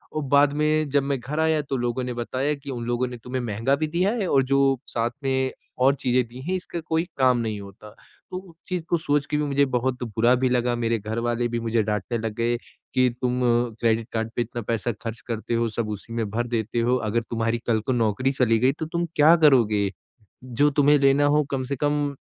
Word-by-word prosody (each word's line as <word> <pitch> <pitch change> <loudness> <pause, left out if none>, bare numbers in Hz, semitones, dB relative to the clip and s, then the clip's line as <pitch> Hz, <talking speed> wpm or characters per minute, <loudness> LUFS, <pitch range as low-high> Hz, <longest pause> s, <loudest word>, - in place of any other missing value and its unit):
और 155 - -1
बाद 140 +1 +4
में 150 0 +1
जब 140 0 +2
मैं 140 -1 -1
घर 140 +6 -4
आया 160 -1 +2
तो 135 -1 -3
लोगों 120 +1 -1
ने 125 - -3
बताया 130 +4 -1
कि 140 0 -11
उन 120 -2 -4
लोगों 120 +1 0
ने 125 0 -7
तुम्हें 130 +1 -3
महँगा 115 +4 0
भी 155 +2 -2
दिया 175 +6 +1
है 190 - -1
और 135 -1 +4
जो 135 +1 +2 0.3
साथ 115 0 -1
में 130 -1 0 0.3
और 140 +1 +5
चीज़ें 125 -2 +1
दी 125 +3 -11
हैं 185 - +1
इसका 175 -1 -5
कोई 160 0 -1
काम 130 -2 +4
नहीं 110 -3 -2
होता 100 +2 -12 0.4
तो 185 - -3
उस 185 -3 -11
चीज़ 180 -2 -2
को 170 - +3
सोच 145 -3 0
के 150 - -1
भी 150 - 0
मुझे 140 -1 +2
बहुत 125 -1 -1
बुरा 115 +2 +2
भी 130 - +4
लगा। 125 -1 +1
मेरे 115 -1 0
घरवाले 115 +3 -1
भी 120 0 -2
मुझे 115 -1 0
डाँटने 105 +3 -2
लग 110 -1 -3
गए 120 +1 +1
कि, 130 +1 -1
"तुम 125 0 0 0.4
क्रेडिट 115 -1 +1
कार्ड 110 0 -1
पे - - +1
इतना 120 0 -4
पैसा 115 +1 -1
ख़र्च 115 +2 -5
करते 115 0 -3
हो 115 0 +1
सब 110 0 -3
उसी 105 +2 -7
में 115 -3 -2
भर 120 +4 -2
देते 115 -1 -2
हो 120 +2 +2
अगर 115 +3 +1
तुम्हारी 115 0 0
कल 115 -2 +2
को 130 - +2
नौकरी 120 +2 +1
चली 120 -4 +2
गई, 130 +3 +4
तो 155 +3 -5
तुम 170 +2 -2
क्या 155 +3 +7
करोगे? 115 - +4 0.5
जो 130 +4 +2
तुम्हें 145 +1 +4
लेना 140 +1 +4
हो 150 +1 +4
कम 135 -2 -1
से - - 0
कम 145 +1 0
125 Hz, 230 wpm, -24 LUFS, 115-145 Hz, 0.5 s, क्या